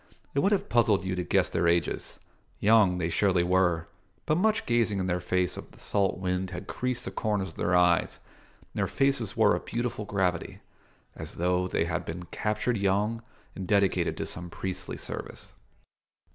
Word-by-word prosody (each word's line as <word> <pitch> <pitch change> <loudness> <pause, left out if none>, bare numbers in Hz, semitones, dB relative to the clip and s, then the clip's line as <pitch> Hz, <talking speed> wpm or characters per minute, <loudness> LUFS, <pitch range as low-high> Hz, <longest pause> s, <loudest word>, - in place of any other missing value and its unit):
It 140 - +1
would 195 +8 +3
have 200 0 +1
puzzled 110 -5 +3
you 95 - -1
to 90 - -1
guess 85 - +2
their 85 0 0
ages. 85 0 0 0.4
Young 105 -4 +5
they 85 -2 0
surely 90 0 +3
were, 90 -2 +2 0.4
but 155 - +2
much 215 +5 +2
gazing 115 -4 +2
in 95 - -1
the 90 -1 0
face 90 0 0
of - - -8
the - - -18
salt 100 -3 0
wind 90 0 -2
had 90 -1 -6
creased 125 -1 -2
the 95 - -4
corners 100 -1 -1
of - - -13
their 90 - +1
eyes, 90 -1 +3 0.4
and - - -27
their - - +1
faces 135 -7 0
wore 105 -3 +5
a - - -2
beautiful 120 0 -3
gravity, 95 -4 -1 0.6
as - - -7
though 90 +1 +1
they 80 - 0
had 85 +1 -2
been 85 +1 -6
captured 105 +3 -1
young 100 +4 +1 0.3
and 95 -2 -5
dedicated 100 -1 +2
to - - -2
some 90 0 -6
priestly 95 +1 -5
service. - - -7
95 Hz, 185 wpm, -28 LUFS, 90-110 Hz, 0.6 s, Young